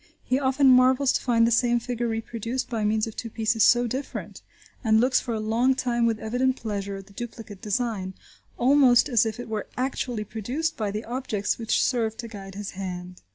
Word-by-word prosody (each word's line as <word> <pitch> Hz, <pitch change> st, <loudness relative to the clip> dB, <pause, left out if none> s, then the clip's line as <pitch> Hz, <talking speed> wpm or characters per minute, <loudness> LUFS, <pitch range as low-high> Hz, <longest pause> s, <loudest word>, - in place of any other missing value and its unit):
He 255 Hz, -, +1 dB
often 270 Hz, 0 st, +3 dB
marvels 255 Hz, +1 st, +5 dB
to -, -, 0 dB
find 230 Hz, -2 st, +3 dB
the 230 Hz, -, +2 dB
same 240 Hz, +1 st, +3 dB
figure 240 Hz, 0 st, -3 dB
reproduced 230 Hz, +3 st, -3 dB
by 225 Hz, -2 st, -1 dB
means 215 Hz, +1 st, +1 dB
of 225 Hz, -, -8 dB
two 230 Hz, -, -5 dB
pieces 225 Hz, 0 st, +1 dB
so 245 Hz, 0 st, +5 dB
different, 260 Hz, +4 st, -5 dB, 0.4 s
and 220 Hz, -2 st, +4 dB
looks 255 Hz, +2 st, +3 dB
for 235 Hz, -3 st, -4 dB
a -, -, -2 dB
long 230 Hz, +5 st, +2 dB
time 240 Hz, -2 st, +1 dB
with 225 Hz, -1 st, 0 dB
evident 245 Hz, +4 st, 0 dB
pleasure 200 Hz, -4 st, -4 dB
at 195 Hz, 0 st, -9 dB
the 200 Hz, -, -18 dB
duplicate 225 Hz, -3 st, -8 dB
design–almost 240 Hz, +5 st, +1 dB
as 230 Hz, -3 st, +3 dB
if 220 Hz, +1 st, -5 dB
it 245 Hz, -, -6 dB
were 215 Hz, -2 st, -4 dB
actually 250 Hz, -3 st, -2 dB
produced 250 Hz, +10 st, -3 dB
by 215 Hz, -2 st, -2 dB
the 210 Hz, +2 st, -4 dB
objects 235 Hz, -5 st, -2 dB
which 225 Hz, -1 st, +1 dB
serve 225 Hz, -3 st, 0 dB
to 235 Hz, -1 st, -6 dB
guide 195 Hz, -3 st, -9 dB
his 205 Hz, 0 st, -5 dB
hand. 180 Hz, -2 st, -7 dB
230 Hz, 200 wpm, -25 LUFS, 215-250 Hz, 0.4 s, marvels